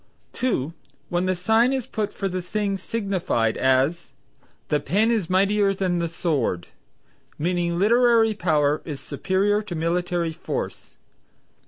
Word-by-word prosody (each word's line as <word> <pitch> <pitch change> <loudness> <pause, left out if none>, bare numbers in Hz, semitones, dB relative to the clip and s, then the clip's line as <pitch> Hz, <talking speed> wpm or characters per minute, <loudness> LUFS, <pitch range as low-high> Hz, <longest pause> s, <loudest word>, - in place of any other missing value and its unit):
(2) 170 - -1 0.4
when 175 +1 0
the 185 - +1
sign 220 +7 +3
is 265 -3 -1
put 210 -1 -3
for 195 - -3
the 185 -1 -3
thing 200 +2 -2
signified; 190 - -1
as, 130 +6 +2 0.6
"The 150 - +2
pen 205 +10 +1
is 215 -8 0
mightier 195 +1 +3
than 185 -2 0
the 170 - 0
sword," 150 - -1 0.7
meaning 170 +1 0
literary 230 +2 +4
power 150 -6 +1
is 150 -4 -6
superior 195 +7 0
to 205 -5 -6
military 170 +1 -1
force. 160 - -6
180 Hz, 135 wpm, -24 LUFS, 165-205 Hz, 0.7 s, literary